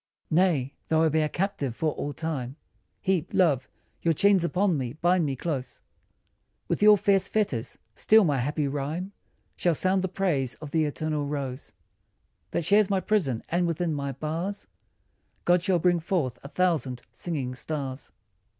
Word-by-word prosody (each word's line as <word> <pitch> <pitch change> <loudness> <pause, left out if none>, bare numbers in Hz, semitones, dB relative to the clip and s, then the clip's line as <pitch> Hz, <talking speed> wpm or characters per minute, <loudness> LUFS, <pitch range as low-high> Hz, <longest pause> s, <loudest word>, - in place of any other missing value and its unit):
Nay, 155 -6 +2
though 160 0 +3
I 160 - +4
be 160 +1 +1
a 155 - 0
captive 160 - -2
for 155 +3 0
all 145 - -4
time 140 -5 -4 0.5
Heap, 185 -4 0
love, 150 -9 +3 0.3
your 165 -1 +2
chains 200 +1 +4
upon 185 +1 +1
me, 125 -4 -3
bind 175 +1 +2
me 135 - -2
close 130 -3 -4 0.9
With - - -1
your 210 0 +8
fierce 195 -1 +3
fetters 140 - -1 0.2
still 220 0 +5
my 145 -6 +1
happy 145 +3 -1
rhyme 150 +7 -3 0.4
Shall 175 -2 +1
sound 185 +4 +1
the 190 - 0
praise 170 -9 -1
of 150 -2 -9
the 160 0 +2
eternal 150 0 -2
rose 140 -2 -5 0.8
That 165 - -2
shares 205 +2 +4
my 195 -1 +2
prison, 175 - 0
and 175 +1 +1
within 165 0 -1
my 140 -1 -2
bars 165 +9 -4 0.8
God 175 0 +4
shall 185 0 +2
bring 175 +1 +2
forth 160 -8 -1
a - - -9
thousand 145 -7 0
singing 135 -1 -3
stars. 135 0 -5
160 Hz, 160 wpm, -27 LUFS, 140-185 Hz, 0.9 s, your